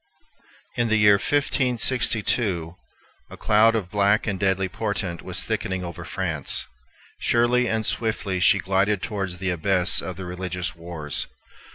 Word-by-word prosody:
In 120 - +1
the 110 - +2
year 105 -2 +5
1562 120 - +1 0.6
a - - -11
cloud 110 +2 +4
of 95 -5 -3
black 100 +1 +2
and 100 -4 -2
deadly 95 -1 +1
portent 90 -3 -3
was - - -3
thickening 95 -1 -3
over 85 -2 -7
France. - - -1 0.5
Surely 120 +1 +2
and 110 -1 -1
swiftly 105 -4 -1
she 95 - +5
glided 95 +1 0
towards 95 -4 -3
the 95 +1 -1
abyss 90 +1 +3
of 95 - -6
the 95 - -7
religious 90 -1 -4
wars. 85 -4 -3
100 Hz, 140 wpm, -24 LUFS, 90-110 Hz, 0.6 s, year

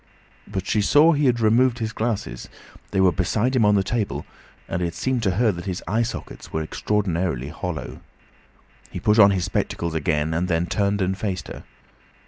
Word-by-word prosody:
But 95 -2 -4
she 105 +1 +1
saw 145 +10 +5
he 145 -1 +1
had 120 -1 +2
removed 120 +3 +3
his 115 -1 -3
glasses; 105 - -3 0.4
they 95 - -1
were 95 -1 +5
beside 105 +9 0
him 125 - +3
on 105 0 +4
the 100 - +3
table, 95 -11 -2 0.4
and 90 - -3
it 85 -1 -2
seemed 130 -2 -1
to 100 -4 +1
her 115 +1 +3
that 85 -2 -7
his 90 -2 -4
eye 110 +6 +1
sockets 120 - -6
were 80 - -1
extraordinarily 85 -7 -1
hollow. 85 +1 -6 0.9
He - - -6
put 105 +1 +3
on 100 -1 +9
his 95 -3 0
spectacles 85 -3 -2
again, 80 0 0
and 85 +3 0
then 85 -1 +1
turned 100 +1 0
and 95 +1 0
faced 95 -2 -4
her. - - -9
100 Hz, 190 wpm, -23 LUFS, 85-110 Hz, 0.9 s, on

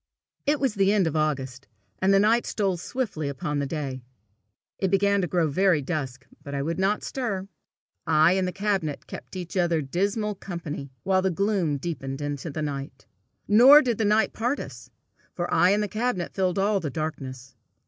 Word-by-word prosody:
It 295 0 +3
was 270 -5 +1
the 195 -1 +3
end 205 -3 +3
of 160 - -1
August, 140 -4 -2 0.3
and 190 +1 +3
the 195 - +5
night 225 +4 +3
stole 195 -3 0
swiftly 175 - -3
upon 145 +2 -3
the 140 - -1
day. 135 -3 -4 0.8
It 190 - +1
began 200 +1 +3
to 180 - -1
grow 170 -2 +1
very 170 0 +2
dusk, 135 -4 -4 0.2
but 140 0 -6
I 140 - -1
would 165 +4 -2
not 195 +2 +1
stir. 200 -8 -3 0.6
I 155 +1 +5
and 190 -1 +1
the - - -2
cabinet 195 -7 -2
kept - - -9
each 180 -1 -6
other 170 -3 +2
dismal 200 +9 -1
company 165 -8 -6
while 190 0 +2
the 190 - +1
gloom 190 -5 0
deepened 135 -3 -5
into 145 +1 -4
night. 140 -2 -5 0.4
Nor 260 +8 +8
did 240 -4 -1
the - - +2
night 215 +2 +2
part 245 +6 -1
us, - - -9 0.5
for 175 -1 -2
I 180 - +5
and 205 +2 +2
the - - -1
cabinet 215 -4 -2
filled 185 -2 0
all 200 +1 +2
the 160 -5 -3
darkness. 135 -4 -5
180 Hz, 185 wpm, -26 LUFS, 145-200 Hz, 0.8 s, Nor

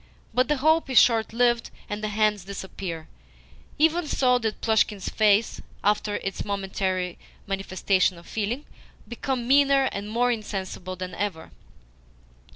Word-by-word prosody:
But 255 0 +3
the 295 - +1
hope 315 +2 +3
is 260 - +1
short 225 -2 +3
lived, 240 0 +2 0.2
and 210 +1 -5
the - - 0
hands 210 -2 +1
disappear. 190 -4 -6 0.7
Even 320 +2 +2
so 250 -3 +3
did 220 -2 -2
Plushkin's 215 -3 +1
face, 215 0 +2 0.2
after 210 0 +1
its 195 - -3
momentary 190 -2 -2 0.3
manifestation 195 -2 0
of 170 - -14
feeling, 225 +7 -3 0.4
become 245 0 -3
meaner 275 0 +5
and 200 +1 -5
more 245 +3 +2
insensible 190 -4 -4
than 185 0 -6
ever. 180 -3 -4
210 Hz, 135 wpm, -25 LUFS, 195-245 Hz, 0.7 s, meaner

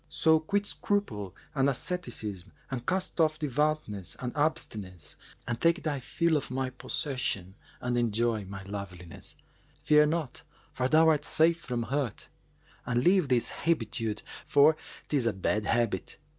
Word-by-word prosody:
So 160 0 +4
quit 200 +6 0
scruple 110 - -2 0.2
and 135 -1 +3
asceticism 110 - -3 0.2
and 125 -2 -4
cast 185 -2 0
off 155 -1 +3
devoutness 150 - -1
and 125 -1 -4
abstinence 95 - -2 0.3
and 120 -1 -2
take 170 +2 +3
thy 150 -3 -1
fill 165 +5 +1
of 140 - -4
my 130 0 -2
possession 125 - -2 0.3
and 125 0 -1
enjoy 115 -2 +1
my 95 0 -7
loveliness. 95 -4 -7 0.5
Fear 150 0 +6
naught, 155 -4 -2 0.3
for 125 - 0
thou 160 +3 +5
art 150 -2 +3
safe 165 +2 +3
from 120 -6 -3
hurt, 135 -1 -2 0.5
and 120 0 0
leave 180 -3 +4
this 120 -2 +2
hebetude 115 -8 -1 0.2
for 145 +2 +6 0.3
'tis 135 -6 +1
a 115 - +2
bad 105 +2 0
habit." 115 -4 0
130 Hz, 145 wpm, -29 LUFS, 105-155 Hz, 0.5 s, Fear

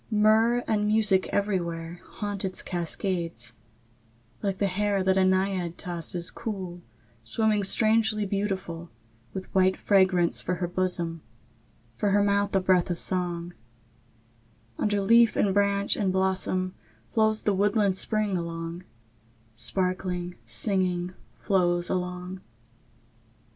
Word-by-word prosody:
II. 215 - +1
Myrrh 225 +3 +4
and 210 -1 +1
music 210 -3 +3
everywhere 175 -4 -2
Haunt 205 -2 -4
its 185 -1 -4
cascades; 170 - -3 0.9
like 195 -2 -1
the 200 - +1
hair 200 0 0
That 190 0 +3
a 190 - +4
naiad 185 -2 +1
tosses 175 0 -3
cool, 190 -6 -5 0.4
Swimming 210 - +1
strangely 215 +1 +2
beautiful, 190 -4 -3 0.4
With 190 -1 -7
white 190 0 +3
fragrance 185 -4 +3
for 180 - -1
her 175 0 -2
bosom, 175 -2 -2 0.8
For 205 - +1
her 200 +1 +4
mouth 200 0 +1
a 190 - +4
breath 185 -1 +3
of 175 - -1
song; 175 -1 -3 1.3
Under 205 -1 +1
leaf 230 +3 +5
and 195 -2 +2
branch 200 0 +2
and 195 -3 0
blossom 185 -1 0 0.4
Flows 220 -1 +2
the 205 - +2
woodland 200 0 +2
spring 215 0 0
along, 170 0 -4 0.7
Sparkling, 180 - -2
singing, 180 - 0 0.2
flows 175 -3 +1
along. 180 0 -3
190 Hz, 120 wpm, -27 LUFS, 175-205 Hz, 1.3 s, leaf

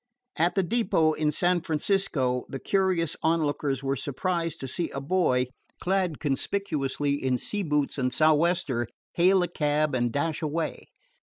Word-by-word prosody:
At 170 +2 +1
the 195 - +3
depot 170 -6 +2
in 155 0 0
San 175 +3 +1
Francisco 155 -6 0
the 135 - -4
curious 185 -1 +1
onlookers 145 -4 0
were 135 0 0
surprised 165 +4 -2
to 135 - -4
see 165 +6 -1
a 135 - -5
boy 135 -4 +2 0.3
clad 185 -4 0
conspicuously 145 -2 -1
in 130 -1 +2
sea 205 +10 -2
boots 150 -5 0
and 130 -1 +1
sou'wester 155 -4 +2 0.3
hail 185 +2 +4
a - - 0
cab 150 -3 0
and 120 -2 +1
dash 155 +5 -1
away. 160 +1 -2
155 Hz, 150 wpm, -27 LUFS, 140-175 Hz, 0.3 s, hail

